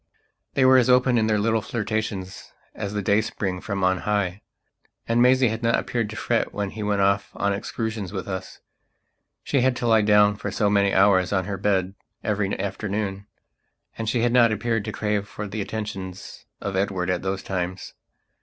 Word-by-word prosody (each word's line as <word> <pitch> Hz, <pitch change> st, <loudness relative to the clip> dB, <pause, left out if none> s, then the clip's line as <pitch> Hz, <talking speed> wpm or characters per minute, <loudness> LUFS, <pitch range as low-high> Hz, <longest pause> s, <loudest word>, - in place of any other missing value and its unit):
They 135 Hz, -, +4 dB
were 130 Hz, 0 st, +7 dB
as 125 Hz, -, +2 dB
open 125 Hz, -1 st, +4 dB
in 110 Hz, -, +1 dB
their 110 Hz, -1 st, +2 dB
little 110 Hz, +2 st, +1 dB
flirtations 105 Hz, -4 st, -4 dB, 0.2 s
as 100 Hz, -1 st, -5 dB
the 105 Hz, -1 st, -2 dB
dayspring 100 Hz, -3 st, 0 dB
from 100 Hz, -2 st, -3 dB
on 95 Hz, 0 st, +2 dB
high. 100 Hz, -2 st, -1 dB, 0.7 s
And 115 Hz, +1 st, +2 dB
Maisie 125 Hz, 0 st, +5 dB
had 110 Hz, +1 st, -4 dB
not 115 Hz, 0 st, +2 dB
appeared 115 Hz, -4 st, -2 dB
to 110 Hz, -, -7 dB
fret 115 Hz, +1 st, 0 dB
when 100 Hz, -1 st, -3 dB
he 110 Hz, -, -7 dB
went 105 Hz, -1 st, 0 dB
off 100 Hz, +1 st, +2 dB
on 100 Hz, 0 st, 0 dB
excursions 110 Hz, -1 st, -4 dB
with 95 Hz, -2 st, -5 dB
us; 95 Hz, -1 st, -6 dB, 0.8 s
she 140 Hz, -, +1 dB
had 130 Hz, 0 st, +2 dB
to 120 Hz, -, -3 dB
lie 110 Hz, -2 st, +5 dB
down 105 Hz, 0 st, +4 dB
for 105 Hz, -, -4 dB
so 105 Hz, 0 st, +1 dB
many 100 Hz, -1 st, +3 dB
hours 95 Hz, -2 st, +4 dB
on 95 Hz, -2 st, +1 dB
her 100 Hz, +1 st, -3 dB
bed 95 Hz, -1 st, 0 dB, 0.3 s
every 100 Hz, -2 st, -1 dB
afternoon, 100 Hz, 0 st, -3 dB, 0.7 s
and 115 Hz, -1 st, -3 dB
she 120 Hz, -, +1 dB
had 120 Hz, 0 st, +2 dB
not 120 Hz, -2 st, +5 dB
appeared 110 Hz, 0 st, -1 dB
to 110 Hz, -, -3 dB
crave 105 Hz, -1 st, -1 dB
for 105 Hz, 0 st, -6 dB
the 105 Hz, +2 st, -4 dB
attentions 95 Hz, -3 st, -6 dB
of 100 Hz, -1 st, -3 dB
Edward 95 Hz, -2 st, 0 dB
at 90 Hz, -, -1 dB
those 95 Hz, 0 st, -3 dB
times. 95 Hz, 0 st, -4 dB
105 Hz, 190 wpm, -24 LUFS, 95-110 Hz, 0.8 s, were